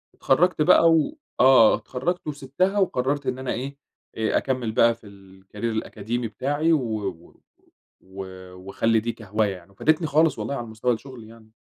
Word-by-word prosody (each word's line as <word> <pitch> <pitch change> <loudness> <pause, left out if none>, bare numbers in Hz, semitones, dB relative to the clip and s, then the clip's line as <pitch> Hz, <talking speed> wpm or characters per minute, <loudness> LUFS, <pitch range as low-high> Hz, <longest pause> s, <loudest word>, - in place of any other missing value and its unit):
اتخرّجت 170 +5 +2
بقى 165 +2 +6
و 165 - +1 0.2
آه 130 -4 +7
اتخرّجت 165 +7 -4
وسبِتها 150 +8 -1
وقرّرت 140 -6 0
إن 130 - -2
أنا 130 -1 -3
إيه، 135 +4 -5 0.4
أ 110 -1 +1
أكمّل 130 -4 -1
بقى 115 +1 +4
في 115 -2 -17 0.3
الcareer 95 - -25
الأكاديمي 115 +1 -3
بتاعي 145 +9 0
و 145 -6 +1 0.2
و 85 -3 -10 0.6
و 95 +1 -9 0.3
وأخلّي 100 +5 0
دي 115 +2 -3
كهواية 105 -2 -2
يعني، 90 +1 -16
وفادتني 155 - +1
خالص 155 +2 +2
والله 140 - -3
على 120 -3 -5
مستوى 110 +3 -1
الشغل 125 0 -9
يعني. 110 0 -16
125 Hz, 160 wpm, -24 LUFS, 110-145 Hz, 0.6 s, آه